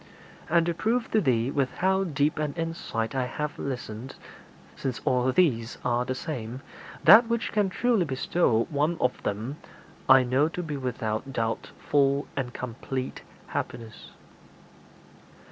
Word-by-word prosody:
And 170 +1 +4
to 170 - 0
prove 225 +7 0
to 215 - +3
thee 125 - +1
with 140 -3 -1
how 190 +1 +2
deep 150 -1 0
an 150 -2 -2
insight 165 -9 -3
I 130 -2 0
have 150 +4 -4
listened 125 -2 -5 0.6
since 130 -3 -3
all 125 0 +2
these 125 -8 +2
are 120 0 +1
the 130 +1 -2
same 125 -3 -5 0.4
that 215 +8 +9
which 235 0 -1
can 205 -2 +2
truly 225 -1 +2
bestow 130 -3 +1
one 150 +4 +1
of 125 - 0
them 110 +8 -3 0.5
I 130 -1 +8
know 130 +4 +2
to 180 +2 -4
be 150 -3 -4
without 125 -2 -3
doubt 115 -3 -2
full 140 0 +2
and 130 -3 -2
complete 125 +2 -5 0.2
happiness.' 115 -2 -6
135 Hz, 145 wpm, -27 LUFS, 125-165 Hz, 0.6 s, that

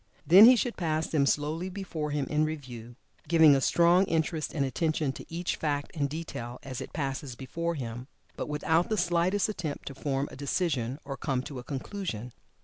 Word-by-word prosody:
Then 190 +6 +9
he 250 +2 +9
should 240 0 -1
pass 160 -2 0
them 140 -3 +1
slowly 155 +6 0
before 180 -6 -4
him 145 -1 -1
in 150 0 +1
review, 125 -7 -5 0.3
giving 160 -3 +7
a 135 - +1
strong 175 +6 +4
interest 160 -2 -1
and 140 -3 0
attention 155 0 0
to - - -11
each 170 +2 -2
fact 145 -2 -2
and 140 -3 0
detail, 130 -6 -6
as 130 -2 -6
it - - -7
passes 135 -3 -4
before 170 +7 -3
him, 120 -2 -6 0.3
but - - -5
without 160 +3 +1
the 215 - 0
slightest 175 +3 +2
attempt 175 -8 -4
to 140 - -6
form 135 0 -2
a - - -9
decision, 140 -3 -1
or 135 -1 -5
come 130 0 -1
to 135 -2 -7
a - - -8
conclusion. 130 - -5
150 Hz, 190 wpm, -29 LUFS, 135-170 Hz, 0.3 s, Then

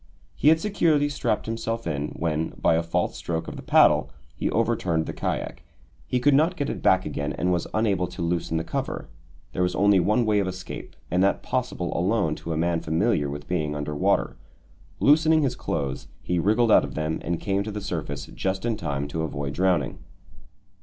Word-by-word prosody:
He - - 0
had 160 +1 +7
securely 160 -7 +2
strapped 125 -6 -1
himself 115 0 -3
in, 75 -2 -2
when, 80 -1 -1
by - - +3
a 80 - +2
false 85 0 -1
stroke 80 -1 -3
of - - -6
the - - -7
paddle, - - +4 0.3
he - - -1
overturned 80 -3 +1
the - - -5
kayak. - - -3 0.5
He 125 - 0
could 145 +3 +4
not 160 +6 +3
get 145 -5 -2
it - - -6
back 95 0 +3
again 70 0 -3
and 90 +3 0
was 85 - -1
unable 100 -5 +1
to 85 - -6
loosen 85 -1 -1
the 80 - -1
cover; - - -4 0.4
there - - -2
was 90 0 +1
only 100 -1 +4
one 105 +7 +2
way 105 -1 +3
of 100 - 0
escape, 95 0 -7 0.2
and 90 +1 +2
that 100 - +1
possible 125 -8 -2
alone 90 -2 +1
to 85 - -6
a 80 - -1
man 85 +1 +1
familiar 80 -1 +1
with 75 +1 -7
being 75 -4 -1
under 75 +1 -3
water. 70 - +1 0.6
Loosening 155 +2 +5
his 130 -3 0
clothes, 70 - -3 0.2
he 90 -1 0
wriggled 110 +5 +3
out - - +7
of 70 -2 -6
them 80 0 -1
and 85 -1 -2
came 100 -1 0
to 105 - -4
the 105 - -4
surface 80 -8 -4
just 95 +2 -3
in 115 -2 +1
time 70 -4 -3
to 80 +3 -3
avoid 70 -3 -3
drowning. 95 +1 +1
90 Hz, 200 wpm, -25 LUFS, 80-115 Hz, 0.6 s, had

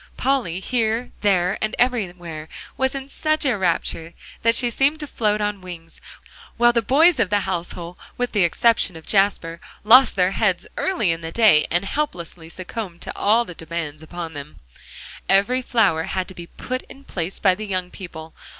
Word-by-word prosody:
Polly, 250 -11 0
here, 230 +2 -1
there, 190 -2 +2
and 215 - -1
everywhere, 175 -10 -1 0.3
was 265 +1 0
in 270 0 -5
such 310 +2 0
a 260 -4 +2
rapture 170 -3 -2 0.3
that 230 0 +4
she 240 0 +3
seemed 280 +5 +1
to - - -3
float 215 -6 0
on 205 -1 -2
wings, 170 -2 -11 0.6
while 240 0 +5
the 235 - +2
boys 295 - +4
of 215 -5 +2
the 205 -1 +2
household, 175 -2 -4 0.2
with 245 0 -1
the 205 -4 +2
exception 210 +1 +2
of 160 - -11
Jasper, 185 -4 +1 0.2
lost 250 +5 +7
their 185 0 +2
heads 195 -3 0
early 225 - 0
in 165 0 -3
the 165 0 -6
day, 205 -8 +5
and 175 +4 +1
helplessly 175 - -4
succumbed 185 0 -7
to - - -6
all 225 +3 +3
demands 165 -4 -6
upon 165 0 -7
them. 145 0 -9 0.7
Every 205 +7 +3
flower 210 -10 +2
had 185 -1 -2
to - - -9
be 175 -1 -9
put 255 +7 -5
in 275 - -13
place 180 -7 -4
by 190 - +4
the 215 +3 -6
young 185 -2 -3
people. 160 -4 -9
195 Hz, 175 wpm, -22 LUFS, 170-235 Hz, 0.7 s, lost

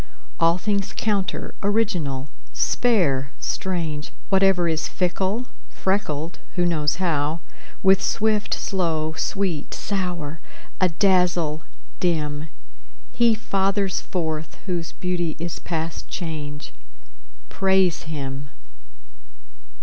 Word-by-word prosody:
All 165 +1 +5
things 200 +1 -1
counter, 205 -3 0
original, 180 -11 +1 0.3
spare, 160 - +2
strange, 165 -5 -2 0.2
Whatever 190 -2 +4
is 160 -1 +1
fickle, 190 +6 0 0.2
freckled 170 -5 -1 0.2
(who 175 - +3
knows 150 -4 +2
how?) 160 -3 +1 0.4
With 190 0 +6
swift, 215 0 +1
slow; 160 -5 0
sweet, 185 -4 -1
sour; 175 -6 -2 0.4
adazzle, 180 -3 +3 0.4
dim. 155 -3 0 0.7
He 235 -2 +5
fathers 195 -2 +1
forth 160 -4 -3
whose 175 -4 -2
beauty 175 -3 -1
is 170 +1 -4
past 165 -1 -3
change; 150 -4 -5 0.8
Praise 190 -2 +3
him. 140 -2 -4
175 Hz, 90 wpm, -24 LUFS, 155-195 Hz, 0.8 s, With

